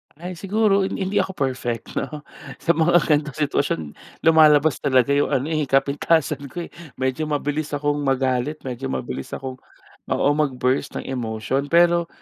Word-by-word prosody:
Ay 175 +2 -8
siguro 200 -1 +2
hin - - -4
hindi 195 +1 0
ako 190 - -2
perfect 125 -4 -3
no. 150 +2 -6 0.4
Sa 170 - +4
mga 170 +1 +2
ganitong 150 -2 +1
sitwasyon 140 - 0 0.4
lumalabas 155 -3 +5
talaga 130 -1 +2
yung 140 0 +2
ano, 140 +3 -1
eh, 155 -3 0
kapintasan 140 +1 +1
ko, 170 +6 -6
eh, - - -11 0.2
medyo 130 +4 -2
mabilis 150 0 -2
akong 145 0 0
magalit, 135 +1 0
medyo 130 +1 -5
mabilis 65 - -4
akong 130 -1 -7 0.5
oo, - - +1
mag-burst 135 -3 0
ng - - -3
emotion. 125 +2 -2
Pero 170 +1 +4
145 Hz, 150 wpm, -22 LUFS, 130-160 Hz, 0.5 s, lumalabas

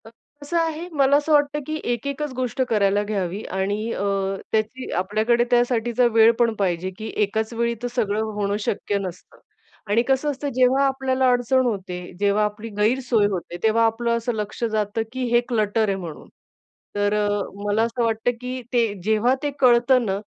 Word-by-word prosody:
अ, - - -11 0.3
कसं 290 +4 -2
आहे, 330 +1 -1
मला 275 +1 +5
असं 295 +2 -2
वाटतं, 290 0 +3
की 310 - -2 0.2
एक-एकच 280 +4 -4
गोष्ट 255 0 -2
करायला 205 -2 +2
घ्यावी. 200 -1 -3
आणि 205 +4 -2
अ, - - -3 0.5
त्याची 220 +4 -2
आपल्याकडे 220 +5 +1
त्यासाठीचा 240 0 +2
वेळ 225 0 +7
पण 235 -1 +3
पाहिजे. 185 -2 0
की 220 0 -6
एकाच 220 +3 -2
वेळी 235 0 0
तर - - 0
सगळं 215 -3 0 0.2
होणं 200 0 0
शक्य 205 0 -1
नसतं. 185 -2 -8 0.5
आणि 215 +3 +3
कसं 270 +2 +1
असतं, 285 +1 -4
जेव्हा 260 +2 +4
आपल्याला 265 -1 +1
अडचण 250 +1 +2
होते, 190 -6 -3 0.2
जेव्हा 205 +1 +2
आपली 210 +2 -5
गैरसोय 230 0 +2
होते, 180 -3 -4
तेव्हा 225 +1 +4
आपलं 235 +1 0
असं 235 +1 -2
लक्ष 210 +1 -5
जातं, 215 -1 -1
की 260 0 -3
हे 240 - +5
क्लटर 220 -1 +1
आहे 195 - 0
म्हणून. 170 -5 -8 0.7
तर 205 0 +1
अ, 210 0 +1 0.4
मला 205 +2 +2
असं 235 +1 -1
वाटतं, 225 +1 +1
की 255 +1 -4
ते 230 -4 +2
जेव्हा 220 +4 +2
ते 290 - 0
कळतं 250 0 +4
ना, 195 -1 -1
230 Hz, 175 wpm, -23 LUFS, 205-255 Hz, 0.7 s, वेळ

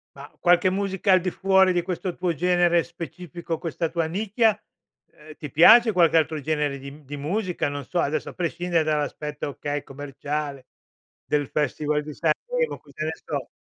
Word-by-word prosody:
Ma 140 +1 -10
qualche 175 +1 +4
musica 195 0 0
al 185 - +6
di 185 - -1
fuori 190 0 +3
di 175 -1 0
questo 180 0 -4
tuo 180 -2 -1
genere 175 +1 +3
specifico, 170 0 -7
questa 165 0 -2
tua 165 -2 -1
nicchia? 215 +4 +1 0.5
Ehm, 155 0 -14
ti 150 -4 -8
piace 225 +8 +7
qualche 165 -3 +4
altro 155 -1 +1
genere 150 -2 -1
di 140 +1 -8
mhmm, 150 +1 -15
di 145 +2 -7
musica? 180 +1 -2
Non 145 -2 -5
so, 175 - -2
adesso 150 0 -1
a - - -10
prescindere 175 -1 -1
dall'aspetto, 150 -1 -2
okay, 145 +1 -4
commerciale, 145 0 -5 0.6
del 145 -2 0
Festival 150 +1 -1
di 150 0 -8
Sanremo, 480 - -1
cosa 145 +1 -8
ne 160 - -1
so? 145 -4 -4
165 Hz, 170 wpm, -24 LUFS, 150-180 Hz, 0.6 s, piace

